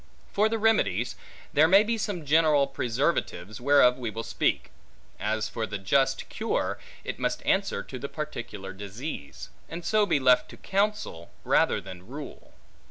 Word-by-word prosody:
For 210 +2 +3
the 225 - 0
remedies; 210 - +2 0.4
there 155 +2 +6
may 195 +4 +7
be 230 +2 0
some 205 -7 -3
general 150 -1 +4
preservatives, 120 - -2
whereof 130 -2 +5
we 120 -3 -2
will 110 +2 -5
speak: - - -1 0.5
as 105 +3 -1
for 115 -2 -3
the 105 - -4
just 135 +7 +1
cure, 225 +1 -2 0.2
it - - -5
must - - -2
answer 195 - +1
to 130 - -8
the 140 +3 -5
particular 110 -10 -6
disease; 100 - -7 0.2
and 170 +1 -7
so 215 +1 +3
be 160 -5 +2
left 125 -1 +4
to - - -11
counsel, 200 - -1
rather - - +3
than 90 0 -11
rule. 140 +3 -9
140 Hz, 160 wpm, -27 LUFS, 110-175 Hz, 0.5 s, may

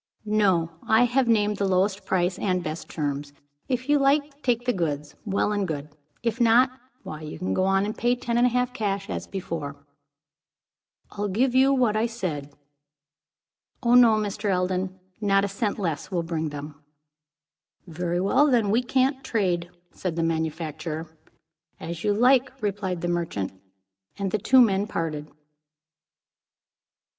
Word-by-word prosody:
"No. 195 -6 +2 0.2
I 220 +2 +5
have 245 +1 +2
named 210 -2 +2
the 200 - 0
lowest 190 +2 +1
price 180 -1 +1
and 185 -3 0
best 155 +1 -5
terms. 145 -2 -3 0.4
If 255 0 -1
you 290 0 +4
like 285 +2 +3
to 280 +1 -29
take 245 -2 0
the 245 - +2
goods, 150 -5 -2
well 200 0 0
and 205 -2 0
good; 150 -2 -4 0.3
if 230 +1 -1
not, 240 +3 +5 0.3
why 155 0 -7
you 155 -1 -7
can 185 +3 -2
go 185 - +1
on 195 +1 +2
and 215 - -3
pay 240 +1 +1
ten 235 -1 -3
and 240 +1 +5
a - - +2
half, 250 +1 0
cash, 200 -2 -2
as - - -4
before." 165 -7 -5 1.4
"I'll 205 0 -3
give 240 +6 +1
you 265 +1 +5
what 250 -6 +2
I 220 +2 +2
said." 160 -11 -4 1.3
"Oh, 240 0 +3
no, 240 -3 +7
Mr. 210 0 -2
Eldon. 185 0 -1 0.2
Not 195 -1 +3
a - - -1
cent 200 +1 -2
less 165 -8 -3
will 175 -4 -1
bring 160 -2 -2
them." 145 0 -8 1.0
"Very 175 0 -2
well. 200 +10 +3
Then 230 -7 +2
we 230 +4 +3
can't 265 +2 +1
trade," 180 -6 0 0.2
said 180 -3 -4
the 165 - 0
manufacturer. 160 0 -3 0.6
"As 170 0 -6
you 210 - +2
like," 250 +4 +4
replied 195 -4 -2
the 175 - -1
merchant. 170 - -2 0.7
And 195 -2 -2
the 215 - 0
two 260 +6 +5
men 200 -3 +3
parted. 155 -6 -3
195 Hz, 160 wpm, -25 LUFS, 170-235 Hz, 1.4 s, no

